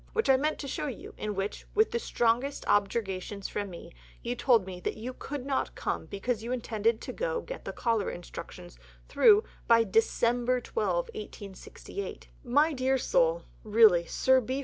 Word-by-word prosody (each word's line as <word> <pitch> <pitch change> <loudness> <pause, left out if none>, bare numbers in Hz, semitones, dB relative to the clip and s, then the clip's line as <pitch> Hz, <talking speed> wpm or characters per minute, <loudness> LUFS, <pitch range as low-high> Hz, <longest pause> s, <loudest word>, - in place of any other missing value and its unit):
which 450 -11 +3
I - - +6
mean 300 +4 +1
to 280 - -7
show 300 +2 -3
you, 260 - -7
in 210 -1 -4
which, 195 +2 -4
with 435 +1 +4
the 235 - 0
strongest 240 +5 0
objurgations 200 -1 -1
of 205 -1 -2
me, 170 -1 -10 0.3
you 240 - -1
told 235 -5 +3
me 185 -1 -7
that 180 - -3
you 245 +4 -5
could 275 0 -6
not 275 -1 -1
come - - -3
because 220 +3 -2
you 235 - -4
intended 225 -2 0
to - - -6 0.3
get - - -7
the - - -3
Cholera 230 -4 0
Instructions 170 - -9 0.3
through 430 -1 +6 0.2
by 230 -1 +6
December 240 +4 +2
12, 450 - -1 0.2
1868. 400 - -8
My 290 +5 +3
dear 265 0 +1
soul, - - +2 0.2
really 210 -6 +5
Sir 260 0 +3
B. 260 +3 -3
235 Hz, 170 wpm, -29 LUFS, 205-275 Hz, 0.3 s, I